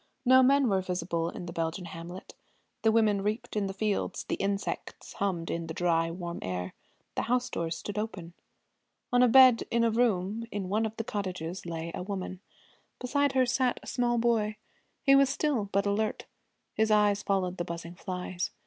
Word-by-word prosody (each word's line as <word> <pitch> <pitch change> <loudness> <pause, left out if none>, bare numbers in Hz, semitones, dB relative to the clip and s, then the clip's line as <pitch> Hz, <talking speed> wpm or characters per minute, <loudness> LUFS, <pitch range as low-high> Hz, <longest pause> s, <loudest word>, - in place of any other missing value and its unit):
No 260 +1 +7
men 275 +1 +4
were 195 -3 +2
visible 170 -2 -2
in 175 - -7
the 170 - -7
Belgian 165 +2 -2
hamlet. 170 +3 -9 0.5
The 220 - +4
women 215 -3 +3
reaped 215 +4 -3
in 205 -2 0
the - - -3
fields; 210 0 -1
the - - -4
insects 200 0 -3
hummed 180 -4 -2
in 165 0 -3
the 160 - -6
dry 165 -2 +2
warm 170 0 -5
air; 90 0 -4 0.4
the - - -1
house 250 0 +1
doors 165 0 -2
stood 205 0 -4
open. 185 -6 -5 0.8
On 245 - +5
a 250 - +7
bed 255 -1 +7
in 235 0 +2
a 230 - +3
room 220 -1 0
in 195 -3 -3
one 220 +3 +1
of 220 - -10
the 225 - -2
cottages 185 -4 -4
lay 165 0 -4
a - - -4
woman. 185 -1 -5 0.6
Beside 285 +2 +1
her 260 -1 +4
sat 250 0 +1
a - - -12
small 240 -1 +1
boy. 225 -2 +1 0.5
He 275 - +6
was 275 -1 +5
still, 270 -7 0
but 200 +1 +1
alert. 210 +2 -1 0.5
His 220 0 +1
eyes 210 -1 +4
followed 190 -3 0
the 175 - -1
buzzing 170 0 -6
flies. 180 0 -4
200 Hz, 185 wpm, -29 LUFS, 175-230 Hz, 0.8 s, No